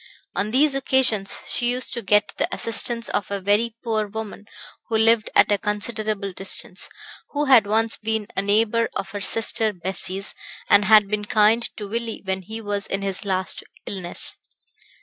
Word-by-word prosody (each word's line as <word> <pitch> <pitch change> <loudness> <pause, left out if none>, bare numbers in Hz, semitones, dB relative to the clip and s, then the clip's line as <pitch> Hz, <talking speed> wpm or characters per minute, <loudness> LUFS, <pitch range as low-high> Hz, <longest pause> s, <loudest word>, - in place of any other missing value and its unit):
On 205 +2 -1
these 275 +5 +3
occasions 260 -7 +1
she 240 - +1
used 250 +1 -2
to 235 - -4
get 210 0 +3
the - - 0
assistance 230 +1 0
of 205 - -2
a 200 0 -2
very 210 +4 +1
poor 220 -3 -1
woman 210 0 -8 0.4
who 225 - 0
lived 225 0 +3
at - - +5
a 205 - +2
considerable 210 -1 -2
distance, 195 +1 0 0.4
who 295 0 0
had 250 -7 +5
once 225 +2 +2
been 220 -1 -2
a - - +1
neighbour 220 +3 +2
of - - -4
her 205 - -5
sister 220 +2 +1
Bessie's, 190 +1 -2 0.3
and 205 - +5
had 210 0 +6
been 210 0 -2
kind 220 +1 +4
to 210 - -6
Willie 230 +1 -4
when 190 0 -2
he 220 +4 -7
was 205 -2 -2
in 195 0 -3
his 195 0 -2
last 185 -1 0 0.2
illness. 185 -3 -3
215 Hz, 170 wpm, -22 LUFS, 200-230 Hz, 0.4 s, had